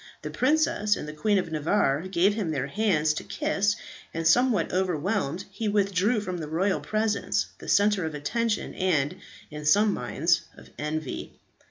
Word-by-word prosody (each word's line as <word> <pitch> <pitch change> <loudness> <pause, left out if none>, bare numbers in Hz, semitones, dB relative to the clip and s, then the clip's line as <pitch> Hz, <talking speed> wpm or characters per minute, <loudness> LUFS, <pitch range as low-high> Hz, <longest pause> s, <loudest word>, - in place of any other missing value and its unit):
The - - -5
princess 255 -7 +2
and - - -6
the 150 - -6
Queen 205 +7 +1
of 180 -3 -2
Navarre 155 0 +1
gave 190 +2 +3
him 205 -6 -2
their 140 -4 -1
hands 155 -3 +1
to - - -5
kiss; 210 -10 0 0.4
and 165 0 -2
somewhat 240 +3 +3
overwhelmed, 185 -1 -1
he 215 +3 -3
withdrew 205 +2 +2
from 185 -3 -4
the 155 - -5
royal 185 +5 0
presence, 205 - 0
the - - -8
centre 205 -2 +3
of 155 - -6
attention, 220 +9 -1
and, 180 -3 0 0.3
in 150 0 -7
some 205 +7 +4
minds, 170 0 +1 0.2
of - - -15
envy. 150 -1 -4
185 Hz, 165 wpm, -26 LUFS, 155-210 Hz, 0.4 s, some